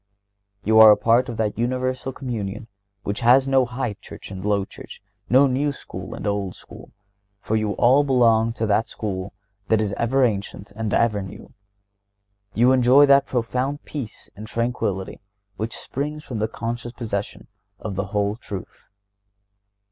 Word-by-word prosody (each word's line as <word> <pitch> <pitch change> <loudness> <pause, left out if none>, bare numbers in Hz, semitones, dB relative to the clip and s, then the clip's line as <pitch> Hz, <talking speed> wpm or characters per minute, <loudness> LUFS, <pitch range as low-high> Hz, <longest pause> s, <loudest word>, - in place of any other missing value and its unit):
(131) - - -12
You 110 0 +7
are 110 - +10
a 105 - +5
part 120 +2 +3
of 115 - -5
that 110 -1 -1
universal 130 +2 -1
Communion 115 -4 -5 0.4
which 100 - -3
has 130 +3 +5
no 135 -2 +3
"High 125 -2 -3
Church" - - -11
and 95 -1 -7
"Low 100 -1 +1
Church;" - - -12 0.3
no 130 +4 +6
"New 140 +2 +1
School" 95 -8 -8
and - - -7
"Old 100 -3 -2
School," - - -14 0.5
for 110 - -2
you 110 -1 0
all 130 +6 +4
belong 115 -4 +3
to 115 -1 -2
that 110 +1 +1
School 95 -2 -4 0.4
which 110 - +3
is 105 -2 -1
"ever 130 +3 +2
ancient 100 -3 -2
and 110 -1 -3
ever 105 -2 +2
new." 95 - -10 1.0
You 120 +3 +5
enjoy 130 +2 +6
that 140 0 +5
profound 130 +4 -2
peace 130 -8 -7
and 105 +2 -9
tranquillity 115 -5 -2 0.4
which 110 +1 -3
springs 150 +3 -4
from 120 -7 -5
the 110 - 0
conscious 120 +2 -5
possession 105 -5 -4 0.3
of 105 -1 -6
the 100 +2 -2
whole 100 +1 -1
truth. 100 -5 -9
115 Hz, 165 wpm, -23 LUFS, 105-130 Hz, 1.0 s, are